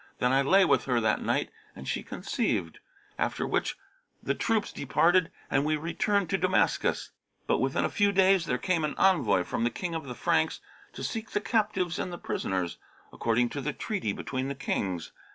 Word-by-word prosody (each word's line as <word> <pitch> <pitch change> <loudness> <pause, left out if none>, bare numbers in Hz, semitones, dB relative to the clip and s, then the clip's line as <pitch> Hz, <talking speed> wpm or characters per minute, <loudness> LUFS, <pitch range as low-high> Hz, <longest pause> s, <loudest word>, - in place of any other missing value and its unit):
Then 125 - +2
I 135 +1 +4
lay 190 +8 +5
with - - +3
her 125 -3 +2
that 110 -1 +1
night - - 0 0.2
and 65 - -9
she - - -1
conceived; 80 -1 -2 0.4
after - - 0
which - - -1 0.5
the 140 - +1
troops 220 +8 0
departed 165 +5 +3 0.2
and 135 - +1
we 155 +1 +1
returned 190 +5 0
to 195 - +1
Damascus. 185 0 +1 0.3
But - - +1
within - - +1
a - - 0
few 205 -1 +3
days 190 -3 +4
there 125 - +1
came 175 -1 0
an 150 - -1
envoy 180 - +3
from 115 - -2
the 120 - +3
King 175 +6 -4
of 160 -3 -4
the 125 -2 -6
Franks, - - +1 0.3
to - - -7
seek 220 -1 -4
the - - 0
captives 205 -5 0
and 180 - -3
the 175 - -5
prisoners, 95 - -2 0.3
according 120 +1 +1
to 140 - -4
the 150 +2 -2
treaty 195 - -2
between 130 +5 -3
the 140 - -3
Kings. 95 -10 -2
155 Hz, 190 wpm, -28 LUFS, 125-190 Hz, 0.5 s, lay